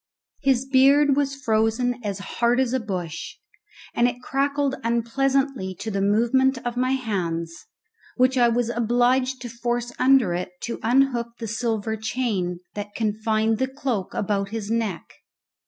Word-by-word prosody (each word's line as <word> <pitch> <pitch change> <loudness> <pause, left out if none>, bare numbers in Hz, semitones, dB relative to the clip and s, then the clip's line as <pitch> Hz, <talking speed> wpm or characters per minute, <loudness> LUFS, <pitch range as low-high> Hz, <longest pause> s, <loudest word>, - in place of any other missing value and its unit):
His 265 -2 +2
beard 275 +2 +5
was 275 -1 0
frozen 240 0 0
as 200 -2 -3
hard 235 +5 0
as 260 -2 +1
a 260 - +2
bush, 180 -7 -5 0.6
and 240 - +3
it 245 0 -3
crackled 280 +1 0
unpleasantly 235 -2 0
to 220 - -5
the 195 -1 -1
movement 240 +6 +3
of 240 0 -2
my 255 +1 +1
hands, 170 -9 -3 0.5
which 255 +1 +3
I 245 -2 +5
was 235 0 +1
obliged 245 +2 +1
to - - -4
force 240 +1 -2
under 255 -8 +4
it 180 +1 -4
to 235 - -4
unhook 240 -1 +1
the 225 - -5
silver 220 -1 -1
chain 210 -6 -2
that 205 0 -6
confined 220 0 0
the 260 - +1
cloak 260 -8 -3
about 200 -1 -1
his 220 -1 -4
neck. 225 -7 -1
235 Hz, 150 wpm, -24 LUFS, 215-260 Hz, 0.6 s, beard